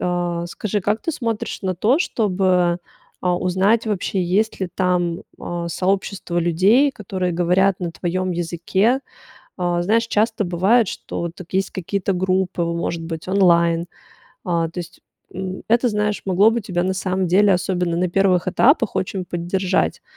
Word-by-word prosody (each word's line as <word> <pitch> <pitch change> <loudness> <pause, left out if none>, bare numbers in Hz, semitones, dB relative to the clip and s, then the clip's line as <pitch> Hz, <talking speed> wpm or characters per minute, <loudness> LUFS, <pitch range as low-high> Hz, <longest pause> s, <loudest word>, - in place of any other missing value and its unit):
а, 175 -1 -1
скажи, 205 +3 -3
как 210 +4 -1
ты 330 - -1
смотришь 230 -6 -3
на 185 -1 -1
то, 230 - +2
чтобы, 185 - +1 0.4
а, 180 -1 +1
узнать 195 +6 +1
вообще, 195 -2 -1
есть 195 +5 0
ли 185 - -1
там, 180 -1 0 0.2
а, 170 -1 -4
сообщество 190 0 -1
людей, 195 - +3
которые 185 -5 -3
говорят 180 +3 +2
на 175 -1 -2
твоем 185 +2 -2
языке? 175 +8 0 0.6
А, 175 -1 0
знаешь, 225 +5 +2
часто 220 0 +1
бывает, 190 +6 +3
что 170 -1 -5
тут 180 0 -13
есть 195 0 +1
какие-то 195 +2 -2
группы, 185 -1 0
может 170 0 -2
быть, 165 0 -6
онлайн. 170 -3 +3 0.6
А, 170 -2 0
то 180 - -8
есть, 170 - -11 0.3
м, 190 0 -5
это, 240 +2 +3
знаешь, 210 -1 -1
могло 195 +4 +5
бы 235 +1 -1
тебя 180 -4 -2
на 190 +1 0
самом 185 0 -1
деле, 195 +3 +4
особенно 180 -2 -1
на 180 +1 +1
первых 185 -1 +2
этапах, 230 - +3
очень 185 0 -2
поддержать. 180 +2 -1
185 Hz, 155 wpm, -21 LUFS, 175-200 Hz, 0.6 s, могло